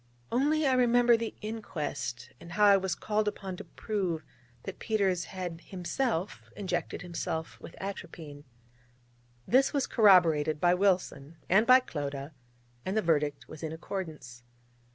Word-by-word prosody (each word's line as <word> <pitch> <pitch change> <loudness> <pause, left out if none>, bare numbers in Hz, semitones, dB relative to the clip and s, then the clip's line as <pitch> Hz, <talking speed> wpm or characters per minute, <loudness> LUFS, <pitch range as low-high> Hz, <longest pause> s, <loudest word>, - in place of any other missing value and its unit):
Only 295 +5 +2
I 265 - +3
remember 245 -1 +5
the 230 -1 -3
inquest, 150 - -5
and 170 0 -10
how 210 +3 +4
I 200 -1 +8
was 190 -2 0
called 215 0 -1
upon 195 -2 -4
to - - -7
prove 185 -7 -3 0.4
that - - -7
Peters 195 -5 0
had 175 -3 -6
himself 190 +1 -2
injected 195 -2 -3
himself 165 -2 -4
with - - -11
atropine. 160 -7 -7 1.0
This 265 +4 +4
was 280 -3 +1
corroborated 165 - +4
by 175 +2 +4
Wilson, 180 -5 0
and 210 +5 +4
by 255 +1 +8
Clodagh: 145 - -5 0.5
and 190 +3 -2
the 215 - +2
verdict 150 -3 0
was 155 - -10
in 160 - -4
accordance. 160 -8 -6
185 Hz, 140 wpm, -30 LUFS, 160-215 Hz, 1.0 s, I